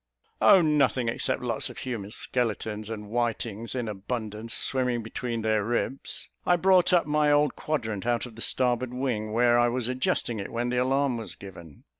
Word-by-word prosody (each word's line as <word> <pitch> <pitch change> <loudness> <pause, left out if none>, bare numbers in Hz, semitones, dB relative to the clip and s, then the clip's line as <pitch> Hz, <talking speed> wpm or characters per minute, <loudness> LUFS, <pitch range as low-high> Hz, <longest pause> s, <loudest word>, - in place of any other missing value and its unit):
"Oh, 190 - +7
nothing, 140 -5 +2
except 115 - -1
lots 115 -3 0
of - - -11
human 115 -6 -5
skeletons, 110 -2 -2
and 105 -2 -6
whitings 115 0 -2
in 120 -3 -2
abundance, 110 +2 -3
swimming 125 -3 +2
between 115 0 -4
their 110 -1 +1
ribs. 120 +4 -1 0.2
I 180 - +3
brought 185 +1 +4
up 175 -2 +4
my 150 0 +2
old 145 -1 +3
quadrant 110 -9 -3
out 120 0 +1
of 120 -3 -11
the 115 - -9
starboard 125 0 0
wing, 120 -5 -2
where 120 +1 +4
I 120 - +4
was 120 -1 -1
adjusting 125 -2 -1
it 100 - -6
when 120 +1 -2
the 125 - -1
alarm 130 0 +1
was 115 - -6
given. 85 -6 -12
120 Hz, 180 wpm, -27 LUFS, 110-130 Hz, 0.2 s, Oh